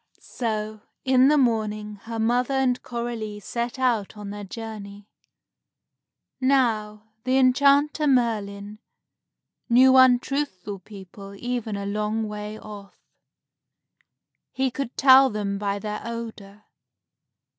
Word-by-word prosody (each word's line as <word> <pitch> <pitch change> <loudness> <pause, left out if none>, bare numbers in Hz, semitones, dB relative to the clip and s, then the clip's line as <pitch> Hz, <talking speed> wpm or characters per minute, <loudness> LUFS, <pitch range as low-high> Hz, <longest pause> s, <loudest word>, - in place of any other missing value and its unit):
So 215 -2 -4 0.2
in 260 0 +5
the 300 +1 +4
morning, 215 -4 0
her 230 0 -5
mother 245 +4 +1
and 255 -2 +1
Coralie 235 -3 -5
set 235 +5 -4
out 235 -5 0
on 205 -1 -7
their 205 0 -7
journey. 205 -1 -8 1.3
Now, 220 -5 0
the 255 +1 +1
enchanter, 280 +3 +3
Merlin, 210 -5 0 0.9
knew 260 +2 +6
untruthful 250 -6 +2
people 195 0 -12
even 240 -2 -3
a 200 0 -4
long 210 +2 -2
way 210 0 -6
off. 205 -2 -11 1.6
He 265 0 -1
could 260 -1 -5
tell 265 0 +7
them 200 -3 -3
by 200 -1 -1
their 210 0 -5
odor. 220 -3 -8
220 Hz, 110 wpm, -24 LUFS, 210-255 Hz, 1.6 s, tell